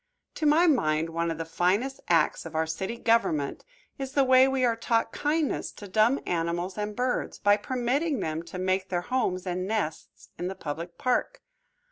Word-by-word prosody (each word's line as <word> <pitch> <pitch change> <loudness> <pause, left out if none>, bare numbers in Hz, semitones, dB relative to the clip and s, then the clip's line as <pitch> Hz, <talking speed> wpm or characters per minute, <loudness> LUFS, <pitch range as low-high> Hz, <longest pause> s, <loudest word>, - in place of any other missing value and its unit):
To 310 - 0
my 315 +4 +5
mind 160 - +2
one 170 +1 -1
of 165 - -3
the 165 - -4
finest 195 +11 0
acts 165 -3 +2
of 165 -1 -9
our 160 0 +2
city 190 +8 -4
government 225 -12 +1 0.4
is 270 0 -5
the 280 - +4
way 260 0 +6
we 265 -1 +1
are 235 -2 +2
taught 230 0 0
kindness 300 0 -1
to 205 - -10
dumb 220 +7 +3
animals 175 +2 -2
and 210 0 -3
birds, 250 +1 -1
by 205 0 +4
permitting 255 +6 -1
them 160 -3 -2
to 170 +2 -8
make 185 +1 0
their 175 -2 0
homes 190 -5 -1
and 185 0 -2
nests 205 -8 -4
in 175 - -2
the 190 - -4
public 170 +2 -6
park. 255 -1 -1
205 Hz, 185 wpm, -27 LUFS, 170-255 Hz, 0.4 s, way